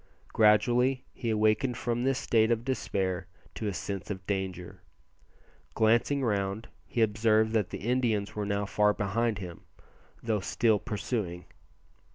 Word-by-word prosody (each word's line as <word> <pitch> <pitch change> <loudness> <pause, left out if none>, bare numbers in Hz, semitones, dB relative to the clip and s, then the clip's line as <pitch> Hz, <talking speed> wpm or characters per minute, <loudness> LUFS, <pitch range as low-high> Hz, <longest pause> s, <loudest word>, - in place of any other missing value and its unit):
Gradually 120 +5 +3
he 120 - -4
awakened 110 +3 +2
from 120 0 -1
this 135 0 +1
state 110 -3 +2
of 115 0 0
despair 95 -8 -2 0.3
to 110 - -4
a 100 - -1
sense 100 +1 -5
of 95 -2 -5
danger. 95 -2 -4 0.9
Glancing 115 +5 +3
round 100 -1 -1 0.2
he 115 - +1
observed 110 0 +2
that 110 -5 +1
the - - -5
Indians 115 -5 0
were 105 -1 -2
now 100 0 0
far 105 +1 +2
behind 105 +2 0
him, 90 -3 -8 0.6
though 110 -2 0
still 110 +2 +2
pursuing. 105 -6 -3
110 Hz, 140 wpm, -29 LUFS, 100-115 Hz, 0.9 s, Gradually